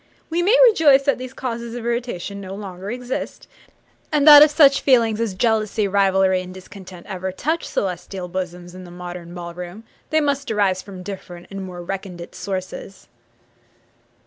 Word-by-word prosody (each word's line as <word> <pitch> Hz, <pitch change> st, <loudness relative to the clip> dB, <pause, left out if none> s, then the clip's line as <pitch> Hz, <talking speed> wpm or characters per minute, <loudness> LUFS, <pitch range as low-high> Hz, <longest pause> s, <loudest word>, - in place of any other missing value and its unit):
We 340 Hz, +2 st, +1 dB
may 415 Hz, +8 st, +4 dB
rejoice 295 Hz, -, +5 dB
that 280 Hz, -2 st, +1 dB
these 255 Hz, 0 st, -7 dB
causes 235 Hz, -3 st, -5 dB
of 240 Hz, -1 st, -6 dB
irritation 235 Hz, -5 st, -3 dB
no 190 Hz, 0 st, -7 dB
longer 195 Hz, -1 st, -7 dB
exist; 250 Hz, +2 st, -5 dB, 0.6 s
and 300 Hz, -1 st, +2 dB
that 295 Hz, -1 st, +11 dB
if 300 Hz, -, +8 dB
such 290 Hz, -2 st, +5 dB
feelings 230 Hz, -5 st, +3 dB
as 215 Hz, -5 st, -2 dB
jealousy, 215 Hz, -1 st, +1 dB
rivalry, 190 Hz, -1 st, +2 dB
and 185 Hz, 0 st, -9 dB
discontent 185 Hz, -1 st, -12 dB
ever 190 Hz, -1 st, -4 dB
touch 315 Hz, -, -2 dB
celestial 185 Hz, 0 st, -4 dB
bosoms 180 Hz, -1 st, -6 dB
in 185 Hz, 0 st, -10 dB
the 180 Hz, -, -11 dB
modern 175 Hz, 0 st, -8 dB
ball 170 Hz, -1 st, -7 dB
room 180 Hz, +5 st, -8 dB, 0.3 s
they 315 Hz, -, +3 dB
must 285 Hz, -2 st, -1 dB
arise 200 Hz, -4 st, +1 dB
from 190 Hz, -3 st, -10 dB
different 180 Hz, -3 st, -8 dB
and 195 Hz, 0 st, -6 dB
more 180 Hz, -2 st, -8 dB
recondite 180 Hz, -2 st, -7 dB
sources. 190 Hz, 0 st, -6 dB
195 Hz, 165 wpm, -21 LUFS, 185-245 Hz, 0.6 s, that